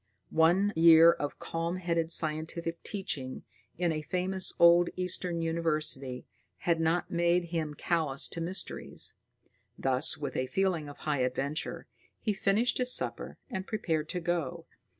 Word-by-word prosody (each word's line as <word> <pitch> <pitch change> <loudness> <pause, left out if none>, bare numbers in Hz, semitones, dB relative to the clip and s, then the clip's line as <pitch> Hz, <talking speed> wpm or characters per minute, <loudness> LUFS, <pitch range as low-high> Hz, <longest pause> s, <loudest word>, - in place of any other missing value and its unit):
One 175 +6 +3
year 165 0 +8
of 145 -4 -4
calm 165 +1 -3
headed 170 -2 -1
scientific 165 +1 0
teaching 140 -10 -4 0.3
in 175 -1 +1
a 155 -1 -2
famous 185 +3 -1
old 170 0 +6
eastern 180 -2 -1
university 155 -6 -1 0.4
had 170 -2 +1
not 165 +2 0
made 170 0 +1
him 155 -3 -2
callous 155 -4 0
to 165 - -5
mysteries. 180 +3 -4 0.6
Thus, 130 -1 +3
with 140 -3 -5
a 130 - -1
feeling 180 -3 0
of 145 - -11
high 150 -3 0
adventure, 135 +4 -2 0.3
he 215 - -1
finished 205 +6 +1
his 250 0 +2
supper - - -2
and 190 -7 -5
prepared 160 -8 -2
to 180 - -1
go. 170 -5 -2
165 Hz, 140 wpm, -30 LUFS, 155-180 Hz, 0.6 s, year